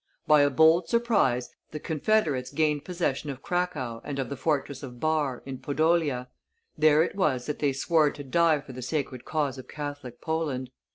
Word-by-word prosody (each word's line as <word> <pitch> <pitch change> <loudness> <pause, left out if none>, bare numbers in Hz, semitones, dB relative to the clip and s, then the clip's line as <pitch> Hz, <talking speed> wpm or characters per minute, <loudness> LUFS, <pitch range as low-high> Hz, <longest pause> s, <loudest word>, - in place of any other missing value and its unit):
By 150 -3 +6
a 145 - +4
bold 160 +4 +4
surprise 205 - +2 0.2
the 150 - -6
confederates 155 -4 0
gained 150 -1 +1
possession 165 -5 -2
of 135 -1 -7
Cracow 155 -11 -2
and 145 - -5
of 135 - -2
the 140 - -4
fortress 140 -2 -1
of 125 -4 -9
Barr, 155 -4 0
in 135 -1 -6
Podolia; 145 -2 +1 0.5
there 155 0 +5
it - - -4
was 140 -10 +1
that 150 - -4
they 145 -2 +2
swore 150 +3 +2
to 145 - -8
die 155 +2 +3
for 135 - -11
the 130 - -7
sacred 130 -2 -3
cause 145 -4 -1
of 130 - -10
Catholic 145 -5 -7
Poland. 145 -6 -2
145 Hz, 180 wpm, -27 LUFS, 130-160 Hz, 0.5 s, By